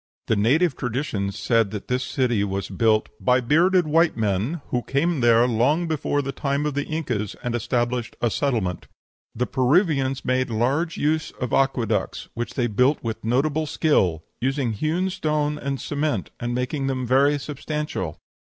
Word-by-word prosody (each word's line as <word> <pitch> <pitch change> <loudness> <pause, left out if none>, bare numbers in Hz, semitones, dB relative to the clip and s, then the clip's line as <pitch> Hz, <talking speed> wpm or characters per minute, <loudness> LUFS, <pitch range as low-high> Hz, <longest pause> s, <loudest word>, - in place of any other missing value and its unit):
The 110 - +1
native 135 - +3
traditions 110 -6 -2
said 115 -4 +2
this 125 +5 -2
city 120 -6 0
was 100 -1 -3
built 110 +2 +2
"by 125 0 +3
bearded 170 +8 +3
white 165 +1 +3
men, 110 - -1
who 125 - 0
came 150 +5 0
there 120 0 +5
long 135 +9 +2
before 150 -2 -1
the 135 - -3
time 140 +1 -1
of 150 - -1
the 145 +1 -1
Incas, 125 -11 -2
and 120 - -2
established 120 0 -1
a 120 - +1
settlement." 110 - -1 0.5
"The 125 - 0
Peruvians 135 0 +1
made 130 0 +1
large 135 +9 0
use 155 +1 0
of 125 -3 -3
aqueducts, 125 -6 0
which 120 0 -5
they 125 - +1
built 125 +6 +2
with 115 -1 -4
notable 145 +7 +1
skill, 95 - +1 0.2
using 135 -1 0
hewn 165 - -1
stones 150 -4 -1
and 140 -1 -3
cement, 145 -8 -2
and 120 0 -2
making 135 +2 -2
them 130 -1 -1
very 140 +4 +3
substantial." 145 - -4
130 Hz, 160 wpm, -23 LUFS, 115-150 Hz, 0.5 s, there